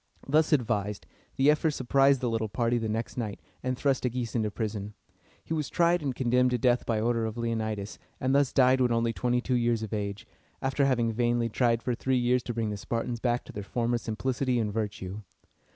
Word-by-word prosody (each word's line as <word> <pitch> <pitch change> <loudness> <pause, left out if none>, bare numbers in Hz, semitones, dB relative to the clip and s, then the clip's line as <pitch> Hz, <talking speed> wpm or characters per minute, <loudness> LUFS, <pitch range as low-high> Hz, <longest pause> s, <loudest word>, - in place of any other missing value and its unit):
Thus 155 +3 +3
advised, 105 -7 0 0.3
the 140 +3 +5
ephors 150 0 +1
surprised 135 +1 +3
the 125 - 0
little 110 -1 -1
party 120 +2 +1
the 110 -1 -2
next 110 +3 -3
night, 110 -4 -3 0.2
and 130 0 -2
thrust 135 -1 +1
Agis 125 -2 -2
into 110 -3 0
prison. 105 -1 -4 0.5
He - - -3
was 155 -3 -2
tried 175 0 +3
and 135 -4 -2
condemned 125 0 +2
to 125 - +1
death 120 +1 +2
by 115 -2 +1
order 115 +1 +1
of 110 +1 -6
Leonidas, 110 -3 -3 0.2
and 130 +1 +1
thus 140 -1 +3
died 130 0 +4
when 125 -1 +3
only 115 0 +1
twenty 125 +1 0
two 130 - -2
years 120 -2 +1
of 110 - -5
age, 100 -1 -3 0.3
after 135 +1 +1
having 120 -4 +1
vainly 120 0 +1
tried 115 0 +1
for 125 - 0
three 130 +2 0
years 125 +1 +2
to 120 - -3
bring 110 -2 -1
the 105 - -4
Spartans 115 +3 -3
back 120 0 0
to - - -10
their 105 - -5
former 120 +3 -1
simplicity 125 +3 -1
and 105 -2 -1
virtue. 105 -2 -4
120 Hz, 210 wpm, -28 LUFS, 110-130 Hz, 0.5 s, the